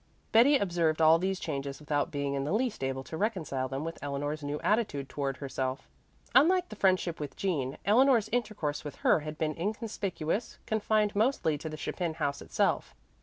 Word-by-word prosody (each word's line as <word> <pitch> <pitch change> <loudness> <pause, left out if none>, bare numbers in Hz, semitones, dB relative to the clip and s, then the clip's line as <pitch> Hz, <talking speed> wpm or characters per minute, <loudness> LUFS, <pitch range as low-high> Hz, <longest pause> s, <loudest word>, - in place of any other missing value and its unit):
Betty 255 +6 +6
observed 170 -7 +1
all 160 +1 +6
these 190 +1 -1
changes 140 -3 -4
without 150 0 -1
being 140 -3 -2
in 135 -1 -1
the 145 - -2
least 230 - 0
able 135 0 -2
to 160 - -7
reconcile 160 - -1
them 135 +2 -4
with 165 +1 -5
Eleanor's 145 +2 -3
new 145 +1 -3
attitude 200 - 0
toward 135 -2 -3
herself. 130 -1 -3 0.5
Unlike 350 +8 +5
the 215 - -8
friendship 185 -4 +1
with 150 -2 -5
Jean, 145 -9 -1
Eleanor's 235 +1 +5
intercourse 210 -11 -2
with 145 - -6
her - - +5
had 155 0 -6
been 155 -1 -1
inconspicuous, 205 -1 -3
confined 215 -1 +1
mostly 215 - +2
to 160 - -5
the 155 - -6
Chapin 165 +1 -3
house 145 -3 -2
itself. - - 0
160 Hz, 175 wpm, -30 LUFS, 145-210 Hz, 0.5 s, Betty